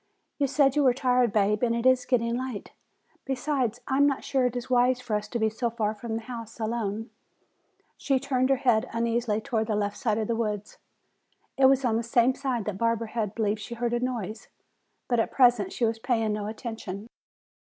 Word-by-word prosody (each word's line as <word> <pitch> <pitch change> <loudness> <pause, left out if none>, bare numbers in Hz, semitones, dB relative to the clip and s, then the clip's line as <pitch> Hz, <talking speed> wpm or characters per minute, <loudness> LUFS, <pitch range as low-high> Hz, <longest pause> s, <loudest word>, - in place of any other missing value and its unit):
"You 280 - +2
said 275 0 +3
you 295 - +3
were 255 -2 +4
tired, 250 -3 +2
Bab, 210 0 +2
and 235 -2 +2
it 235 +1 -2
is 255 -1 +4
getting 235 -2 +1
late. 250 -4 -5 0.5
Besides, 255 -3 -1
I 265 - 0
am 285 +1 +5
not 275 -2 -1
sure 260 -2 +1
it 250 - -5
is 245 0 -4
wise 250 0 +3
for 245 -4 -3
us 210 - -2
to 240 - -3
be 220 -1 +2
so 225 +2 -1
far 220 -2 -1
from 220 +1 -5
the 225 - -4
house 230 -1 -8
alone." 220 0 -3 0.9
She 270 -2 +1
turned 260 -1 0
her 270 - +5
head 250 -2 +2
uneasily 230 -1 0
toward 220 -1 -1
the 215 - 0
left 205 -1 -1
side 220 -6 0
of 220 -2 -1
the 230 - 0
woods. 210 -3 -3 0.8
It 270 - +4
was 270 0 +3
on 225 -2 +2
the - - 0
same 235 +2 +3
side 255 -6 -2
that 200 -2 -4
Barbara 230 -1 0
had 215 -3 -3
believed 215 -2 0
she 235 +3 -7
heard 240 0 -1
a 240 - +1
noise. 230 -4 -4 0.6
But 240 -2 +1
at 225 - +1
present 240 -7 +4
she 240 - 0
was 225 0 -1
paying 225 -3 0
no 210 -1 -3
attention. 215 -3 -6
235 Hz, 215 wpm, -27 LUFS, 220-255 Hz, 0.9 s, am